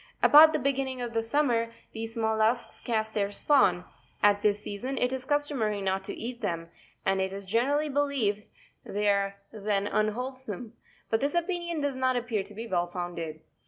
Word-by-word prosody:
About 310 +2 +9
the 310 - +1
beginning 270 -2 -1
of 240 -1 -4
summer 230 -2 +1 0.2
these 225 0 -5
mollusks 220 +1 +1
cast 220 -2 -1
their 200 -1 0
spawn: 195 -8 +3 0.4
at 205 0 +5
this 210 -1 +2
season 250 +8 -4
it 250 +1 +1
is 260 -1 -4
customary 285 -8 0
not 190 0 -1
to - - -3
eat 240 +1 -6
them, 170 -5 -3 0.3
and 195 0 +2
it 190 0 -1
is 195 0 -6
generally 270 +9 +1
believed 270 -8 0 0.4
they 205 +1 -2
are 200 -1 +2 0.2
then 205 -2 0
unwholesome, 230 +1 -2 0.4
but 225 - +2
this 285 +4 0
opinion 345 -2 -1
does 285 -2 0
not 260 0 +1
appear 240 -4 -1
to 200 +1 -11
be 225 +2 -5
well 175 -5 0
founded. 170 -3 -5
225 Hz, 170 wpm, -28 LUFS, 200-265 Hz, 0.4 s, About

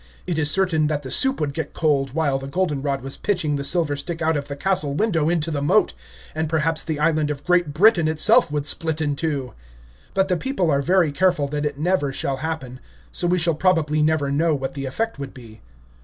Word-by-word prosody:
It 175 -3 -2
is 150 -2 +3
certain 165 -3 +2
that 150 -1 -2
the 130 - -6
soup 265 0 +2
would 145 -2 -2
get 160 +2 -5
cold 140 -4 +1
while 145 -4 +1
the 135 - -7
Golden 150 -2 -1
Rod 140 -2 -2
was 135 0 -5
pitching 175 -8 -1
the 140 - -3
Silver 160 -2 0
Stick 165 +4 -5
out 160 -1 +1
of 145 -1 -3
the 140 - -5
Castle 150 -3 0
window 165 -5 +1
into 165 -2 0
the 145 -2 -2
moat, 145 - +2 0.4
and 160 0 -2
perhaps 160 0 0
the 160 -2 -3
island 155 -1 +1
of 145 -1 -5
Great 175 -3 +2
Britain 175 +1 +4
itself 155 -1 +4
would 145 -1 -2
split 160 +1 +1
in 145 -2 -1
two. 140 -4 -3 0.6
But 190 0 +2
the 180 -2 0
people 185 - -1
are 140 0 +2
very 175 0 +2
careful 170 -2 +1
that 150 +1 -1
it 145 -1 -6
never 160 -2 0
shall 135 0 -2
happen, 135 -4 -5 0.3
so 175 - 0
we 180 +1 +2
shall 165 -1 +2
probably 155 -2 +1
never 150 -2 +1
know 155 +2 +2
what 135 -1 -4
the 140 -1 -5
effect 225 +8 -3
would 140 -1 -7
be. 115 -4 -13
155 Hz, 225 wpm, -22 LUFS, 140-170 Hz, 0.6 s, Britain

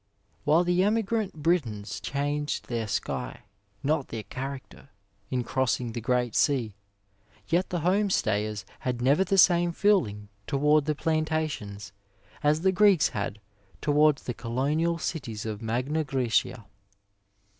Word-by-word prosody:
While 155 +4 +4
the 180 +1 +2
emigrant 215 -5 0
Britons 120 - 0
changed 145 +1 -2
their 115 -2 -2
sky, - - -3 0.4
not 145 -1 0
their 115 -2 -5
character, 135 +2 -7 0.4
in 125 -1 -1
crossing 125 -1 -1
the 120 +1 -5
great 125 -1 0
sea, 125 -7 +2 0.8
yet 180 +2 +1
the 175 -2 -2
home 195 +5 +2
stayers 105 - 0
had 125 -2 -2
never 140 +9 +3
the 195 +1 0
same 175 -1 +5
feeling 120 - +1 0.2
toward 150 +1 +3
the 155 0 0
plantations 155 -11 -2 0.5
as 150 +1 +2
the 190 +1 +3
Greeks 190 -3 +4
had 105 0 -4 0.4
towards 150 -1 +3
the 125 - -3
colonial 145 +9 0
cities 115 -11 -4
of 110 -1 -4
Magna 125 +8 -1
GrsBcia. 125 -4 0
145 Hz, 130 wpm, -27 LUFS, 120-165 Hz, 0.8 s, same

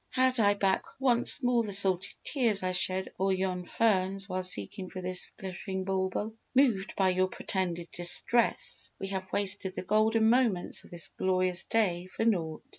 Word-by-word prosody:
Had 255 -1 +1
I 205 -2 +3
back 195 -1 0 0.2
once 255 +1 +4
more 245 -1 +2
the 215 -3 -4
salty 190 -2 +3
tears 230 -9 +1
I 185 - -1
shed 185 +1 0
o'er 195 +1 +1
yon 185 -1 -3
ferns 195 -2 0
while 185 -1 -3
seeking 185 - -2
for 185 - -8
this 185 0 -2
glittering 190 0 -6
bauble! 190 +3 -2 0.2
Moved 235 -6 +2
by 190 -1 +2
your 185 0 +1
pretended 175 -2 -4
distress 175 +7 +2
we 195 - -6
have 190 -1 -5
wasted 195 -1 +1
the - - -5
golden 220 +3 +2
moments 230 -6 +1
of - - -17
this 170 -2 -2
glorious 185 -1 0
day 185 -6 -1
for 225 - -4
naught!" 165 -8 -1
190 Hz, 170 wpm, -29 LUFS, 185-220 Hz, 0.2 s, once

